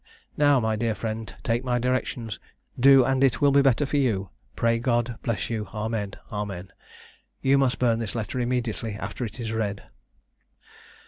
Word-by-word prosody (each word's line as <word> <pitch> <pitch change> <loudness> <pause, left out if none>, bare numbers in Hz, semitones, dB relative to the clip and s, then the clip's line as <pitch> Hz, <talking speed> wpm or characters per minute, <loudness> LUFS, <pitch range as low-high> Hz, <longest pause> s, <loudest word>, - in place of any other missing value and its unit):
Now, 145 -2 +4
my 110 -2 0
dear 115 -1 0
friend, 110 0 -4
take 115 +2 0
my 125 -1 0
directions, 125 -3 -2 0.4
do 135 0 +7
and 135 +1 +2
it 135 -3 +3
will 145 -1 +4
be 140 +1 +5
better 135 +1 +3
for 145 +1 -1
you. 105 -9 0 0.2
Pray 115 0 +2
God 120 -1 0
bless 115 -3 -2
you. 110 -2 -2
Amen. 105 -2 -3 0.2
Amen. 100 -3 -5 0.7
You 135 +1 +4
must 130 -2 +2
burn 115 -2 +2
this 115 -1 -4
letter 115 +2 -3
immediately 120 -2 -2
after 115 - -5
it 110 +3 -8
is 115 -2 -3
read." 105 -3 -2
115 Hz, 170 wpm, -25 LUFS, 110-130 Hz, 0.7 s, do